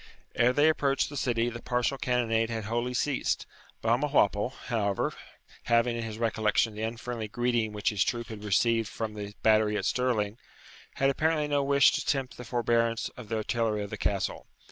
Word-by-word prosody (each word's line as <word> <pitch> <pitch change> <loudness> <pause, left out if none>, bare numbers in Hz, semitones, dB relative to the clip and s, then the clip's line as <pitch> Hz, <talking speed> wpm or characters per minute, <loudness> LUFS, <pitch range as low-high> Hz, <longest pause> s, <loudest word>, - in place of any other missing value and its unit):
Ere 120 +1 +4
they 145 +4 +4
approached 140 -3 +2
the 145 - -8
city 120 -4 0
the 120 0 -5
partial 125 +2 0
cannonade 115 -3 0
had 115 -1 -3
wholly 120 +4 -2
ceased. 140 +1 0 0.4
Balmawhapple, 115 -3 +2 0.2
however, 100 -5 0 0.5
having 115 0 +3
in 120 - -3
his 110 -1 -5
recollection 110 -1 +1
the 105 - -7
unfriendly 115 0 -4
greeting 120 0 0
which 105 -1 0
his 105 -3 +1
troop 120 -1 -3
had 105 -2 -8
received 115 +2 +2
from 110 -2 -4
the 105 -1 -7
battery 110 -1 +4
at - - -2
Stirling, 115 -4 0 0.6
had 135 0 +3
apparently 155 +1 +1
no 145 -1 +1
wish 140 0 +5
to - - -1
tempt 135 -3 -1
the 125 - -7
forbearance 115 -1 0
of 120 -4 -12
the 115 - -1
artillery 110 -1 -1
of 100 - -8
the - - -3
Castle. - - -2
115 Hz, 180 wpm, -28 LUFS, 110-125 Hz, 0.6 s, wish